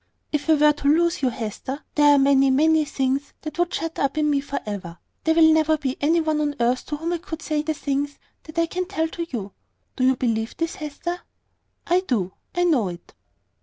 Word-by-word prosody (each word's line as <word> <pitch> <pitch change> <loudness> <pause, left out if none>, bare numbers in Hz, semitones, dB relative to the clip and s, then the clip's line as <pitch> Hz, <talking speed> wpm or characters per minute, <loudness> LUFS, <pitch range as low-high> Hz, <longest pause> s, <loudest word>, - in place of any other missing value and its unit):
"If 300 +1 -2
I 315 - +7
were 300 0 +5
to 290 -1 -3
lose 335 +3 +3
you, 260 - +2
Hester, 245 +5 -5
there 290 -1 +6
are - - +4
many, 275 0 +4
many 310 +3 +4
things 275 -1 -1
that 310 +1 -6
would 350 0 +2
be - - -4
shut 330 0 -4
up 275 +2 0
in 300 -1 +2
me 280 -1 +2
for 280 0 -4
ever. 190 -5 -6 0.3
There 320 0 +3
will 320 -1 +7
never 315 0 +3
be 270 -3 -2
any 320 +4 +3
one 310 -1 0
on 290 -1 -1
earth 245 +2 +1
to 295 - -3
whom 330 +3 -2
I 345 - -2
could 320 -2 -7
say 305 -1 0
the 310 +1 -2
things 285 0 -2 0.3
that 315 0 -12
I 335 - +4
can 365 +2 -3
tell 325 -5 -1
to 335 0 -5
you. 205 -6 -5 0.4
Do 255 - -1
you 260 +1 +4
believe 225 -3 -1
this, 330 0 -1
Hester?" 310 +4 -5 0.6
"I 355 +1 +3
do. 220 - -1 0.2
I 355 - +2
know 290 - +3
it." 175 -1 -9
295 Hz, 230 wpm, -23 LUFS, 265-320 Hz, 0.6 s, I